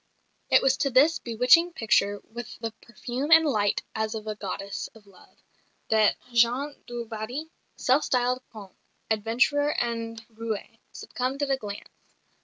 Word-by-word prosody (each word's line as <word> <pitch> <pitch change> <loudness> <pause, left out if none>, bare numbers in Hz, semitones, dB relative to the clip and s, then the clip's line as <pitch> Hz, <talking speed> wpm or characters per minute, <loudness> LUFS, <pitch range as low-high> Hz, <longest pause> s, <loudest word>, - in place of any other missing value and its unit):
It - - +5
was 270 0 +3
to 275 - +1
this 280 +6 +4
bewitching 250 +9 +4
picture, 205 -5 +1
"with 235 0 -8
the 225 - -4
perfume 245 +4 -5
and 325 -1 +8
light 210 -8 +1
as 220 0 -2
of 215 -1 -6
a 215 - -3
goddess 195 -1 -5
of 215 -2 -17
love," 195 -2 -20 0.5
that 215 -1 +4 0.2
Jean 245 +5 +2
du 240 -1 -5
Barry, 235 +8 -6 0.2
self 260 +4 +2
styled 250 0 +1
Comte, 205 -4 -12 0.4
adventurer 235 +7 +2
and 230 -1 -2
roué, 225 -2 -6
succumbed 265 +3 -3
at 280 - -1
a 270 - +2
glance. 205 -4 -10
235 Hz, 150 wpm, -26 LUFS, 215-265 Hz, 0.5 s, and